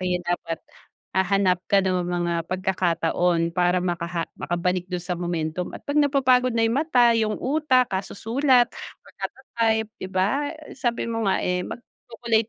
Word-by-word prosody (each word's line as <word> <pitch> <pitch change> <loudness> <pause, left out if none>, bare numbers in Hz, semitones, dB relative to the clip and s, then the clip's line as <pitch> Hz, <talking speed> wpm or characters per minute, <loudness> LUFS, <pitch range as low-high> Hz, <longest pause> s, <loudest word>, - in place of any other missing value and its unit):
Kaya 180 -1 0
dapat 165 -2 -2 0.5
hahanap 190 -1 +2
ka 195 -1 +4
ng 185 -1 +1
mga 175 -1 -1
pagkakataon 175 -2 0
para 180 0 +2
makaha 170 -1 -2
makabalik 180 +1 -2
dun 180 -1 -3
sa 180 - -2
momentum 175 0 -2
at - - -16
pag 285 +1 +2
napapagod 255 -4 +3
na 225 - +3
yung 235 +6 +2
mata, 245 -7 +4
yung 220 -2 +1
utak, 260 -5 +2
kasusulat, 240 +6 +2 0.3
pagkata-type 225 -4 -2
'di 185 - -5
ba? 205 +10 0 0.2
Sabi 240 -3 -1
mo 225 -3 -1
nga, - - +1
eh, 180 0 0
mag-chocolate 230 +1 -3
195 Hz, 145 wpm, -24 LUFS, 180-240 Hz, 0.5 s, ka